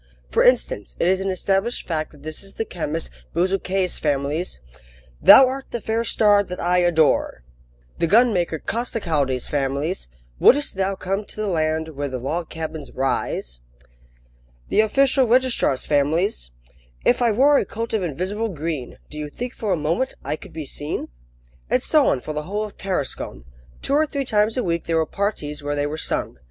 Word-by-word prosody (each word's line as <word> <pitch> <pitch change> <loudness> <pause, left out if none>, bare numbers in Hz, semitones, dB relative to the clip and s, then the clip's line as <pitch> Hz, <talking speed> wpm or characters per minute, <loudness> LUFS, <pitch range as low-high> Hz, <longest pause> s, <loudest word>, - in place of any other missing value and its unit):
For - - +1
instance, - - +2
it - - +2
is 190 +1 +2
an 195 - -1
established 195 +5 0
fact 155 -2 -2
that 145 -2 -17
this 155 0 -6
is 195 0 -11
the 225 - -2
chemist 165 -3 -4 0.2
Bezuquet's 185 +1 0
family's: 145 - -1 0.6
"Thou 265 - +10
art 265 +1 -3
the 235 - -3
fair 225 +1 -1
star 210 -3 +4
that 180 -2 -6
I 180 +1 +2
adore!" 160 - +2 0.6
The 170 - +2
gunmaker 200 -6 +3
Costecalde's 155 - -1
family's: 140 - -1 0.3
"Would'st 290 +2 +5
thou 195 0 -1
come 195 +2 -2
to - - -10
the 215 - -2
land 160 -2 0
Where 145 -2 -4
the 130 - -3
log 155 +7 -3
cabins 160 -3 -6
rise?" - - -2 1.1
The - - +4
official 265 +4 +3
registrar's 245 - +2
family's: 145 - +1 0.6
"If - - +3
I 235 -2 +4
wore 275 +6 +5
a - - +1
coat 230 +1 -5
of 220 - +1
invisible 185 +7 -2
green, 155 - -4
Do 150 - -7
you 150 -1 -4
think 245 - -6
for 215 -3 -3
a 180 - +2
moment 165 - -1
I 145 +2 -1
could - - -13
be 160 -2 -6
seen?" 145 +3 -4 0.6
And - - +2
so - - +4
on - - +1
for 155 - -5
the 150 - -2
whole 210 +2 -1
of 210 - -7
Tarascon. 145 - -3 0.4
Two - - -1
or 305 +2 +3
three 280 -2 -3
times 215 0 +1
a 250 - +1
week 170 -1 -1
there 165 -1 +1
were 160 - +2
parties 155 -7 -3
where 145 0 -2
they 145 0 0
were 145 +1 -3
sung. 160 - -2
175 Hz, 180 wpm, -22 LUFS, 150-215 Hz, 1.1 s, Thou